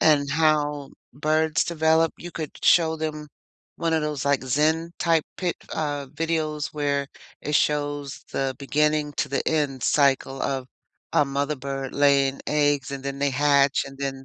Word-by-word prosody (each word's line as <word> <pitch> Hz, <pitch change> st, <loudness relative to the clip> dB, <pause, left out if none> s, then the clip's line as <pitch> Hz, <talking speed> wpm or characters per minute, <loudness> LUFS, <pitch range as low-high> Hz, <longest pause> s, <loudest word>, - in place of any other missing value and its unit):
and 145 Hz, -2 st, +4 dB
how 150 Hz, -2 st, +1 dB, 0.2 s
birds 155 Hz, +3 st, +1 dB
develop, 160 Hz, -1 st, +2 dB
you 175 Hz, -, -8 dB
could 160 Hz, -3 st, -5 dB
show 160 Hz, -2 st, +4 dB
them 155 Hz, -1 st, -4 dB, 0.5 s
one 165 Hz, -1 st, 0 dB
of 160 Hz, -, +1 dB
those, 150 Hz, -3 st, -2 dB
like, 140 Hz, -2 st, +2 dB
zen-type 160 Hz, +4 st, +1 dB
pic 180 Hz, -2 st, -2 dB, 0.2 s
uh, 145 Hz, -3 st, -2 dB
videos 155 Hz, -1 st, -2 dB
where 140 Hz, -1 st, 0 dB, 0.3 s
it 150 Hz, -, -3 dB
shows 145 Hz, -2 st, 0 dB
the 135 Hz, -1 st, -1 dB
beginning 150 Hz, +1 st, +1 dB
to -, -, 0 dB
the 135 Hz, -, -2 dB
end 145 Hz, -5 st, -1 dB
cycle 135 Hz, -1 st, +2 dB
of 135 Hz, -2 st, -2 dB, 0.5 s
a -, -, +5 dB
mother 140 Hz, +1 st, -2 dB
bird 135 Hz, 0 st, -5 dB
laying 140 Hz, -1 st, +3 dB
eggs, 145 Hz, -2 st, +1 dB
and 140 Hz, -1 st, -5 dB
then 140 Hz, 0 st, -4 dB
they 140 Hz, 0 st, +1 dB
hatch, 140 Hz, 0 st, +3 dB
and 135 Hz, 0 st, -11 dB
then 135 Hz, -1 st, -4 dB
145 Hz, 155 wpm, -24 LUFS, 140-155 Hz, 0.5 s, a